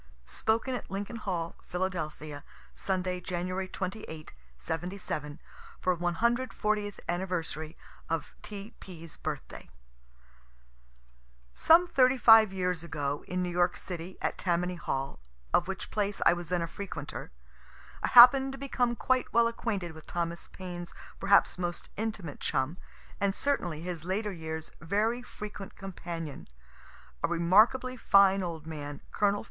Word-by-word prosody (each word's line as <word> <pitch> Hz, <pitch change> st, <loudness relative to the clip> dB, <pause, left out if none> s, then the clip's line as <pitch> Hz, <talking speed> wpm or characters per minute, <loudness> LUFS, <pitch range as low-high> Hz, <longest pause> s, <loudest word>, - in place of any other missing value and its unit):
Spoken 225 Hz, -, 0 dB
at 245 Hz, -, -5 dB
Lincoln 200 Hz, +4 st, -4 dB
Hall, 175 Hz, -6 st, -3 dB
Philadelphia, 155 Hz, -5 st, -4 dB, 0.3 s
Sunday, 185 Hz, -1 st, -1 dB
Jan. 180 Hz, 0 st, -3 dB, 0.2 s
28, 185 Hz, -5 st, -6 dB, 0.2 s
'77, 160 Hz, -, -4 dB, 0.4 s
for 185 Hz, -1 st, +2 dB
140th 210 Hz, +3 st, 0 dB
anniversary 170 Hz, -3 st, -3 dB, 0.3 s
of 165 Hz, -1 st, -2 dB
T. 205 Hz, +2 st, -8 dB
P.'s 165 Hz, -4 st, -9 dB
birthday. 150 Hz, -3 st, -6 dB, 1.8 s
Some 335 Hz, +2 st, +6 dB
thirty 260 Hz, -6 st, +4 dB
five 225 Hz, -4 st, +8 dB
years 180 Hz, -3 st, -1 dB
ago, 145 Hz, -4 st, -3 dB
in 180 Hz, 0 st, -1 dB
New 180 Hz, -, -2 dB
York 175 Hz, +1 st, +2 dB
city, 180 Hz, 0 st, -6 dB
at -, -, -1 dB
Tammany 180 Hz, 0 st, 0 dB
hall, 135 Hz, -, -3 dB, 0.3 s
of 175 Hz, -, +4 dB
which 195 Hz, -1 st, -5 dB
place 205 Hz, -1 st, -1 dB
I -, -, +7 dB
was 175 Hz, -2 st, -6 dB
then 180 Hz, -2 st, +1 dB
a -, -, -3 dB
frequenter, 200 Hz, +3 st, -6 dB, 0.7 s
I -, -, +1 dB
happen'd 265 Hz, +2 st, +9 dB
to -, -, -7 dB
become 250 Hz, -3 st, 0 dB
quite 255 Hz, +1 st, +1 dB
well 235 Hz, 0 st, +5 dB
acquainted 210 Hz, -6 st, -2 dB
with 160 Hz, -1 st, -13 dB
Thomas 170 Hz, 0 st, -3 dB
Paine's 175 Hz, -2 st, -8 dB, 0.2 s
perhaps 195 Hz, -2 st, +4 dB
most 175 Hz, -1 st, -3 dB
intimate 205 Hz, -8 st, -4 dB
chum, 135 Hz, +6 st, -1 dB, 0.4 s
and 200 Hz, -1 st, +1 dB
certainly 175 Hz, -, -1 dB
his 170 Hz, -2 st, -5 dB
later 200 Hz, +4 st, -1 dB
years' 160 Hz, -2 st, -5 dB
very 215 Hz, +8 st, +1 dB
frequent 210 Hz, -5 st, -8 dB
companion, 170 Hz, -5 st, -6 dB, 0.7 s
a -, -, +2 dB
remarkably 215 Hz, +10 st, +4 dB
fine 195 Hz, -3 st, +5 dB
old 165 Hz, -4 st, -4 dB
man, 145 Hz, -2 st, -6 dB
Col. 205 Hz, 0 st, +2 dB
185 Hz, 130 wpm, -30 LUFS, 165-210 Hz, 1.8 s, happen'd